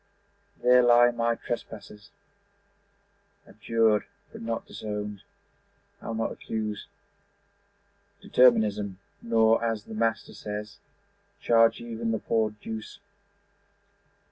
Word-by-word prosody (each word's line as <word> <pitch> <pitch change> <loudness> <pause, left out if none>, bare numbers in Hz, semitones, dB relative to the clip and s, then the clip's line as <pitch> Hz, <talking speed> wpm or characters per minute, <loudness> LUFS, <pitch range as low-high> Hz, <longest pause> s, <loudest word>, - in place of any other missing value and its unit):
There 125 0 +6
lie 120 0 +6
my 115 0 0
trespasses, 105 -4 -7 1.4
Abjured 110 0 +1 0.3
but - - -10
not 115 0 -3
disowned. 105 -1 -6 0.8
I'll 115 - -5
not 115 0 -1
accuse 105 -2 -5 1.3
Determinism, 105 -6 +3 0.2
nor, 115 0 +3
as 115 -2 -1
the - - -10
Master 115 +1 -1
says, 105 0 -7 0.6
Charge 115 -1 +4
even 115 -1 -3
'the 110 - 0
poor 110 0 0
Deuce'. 110 - -8
110 Hz, 90 wpm, -27 LUFS, 105-115 Hz, 1.4 s, There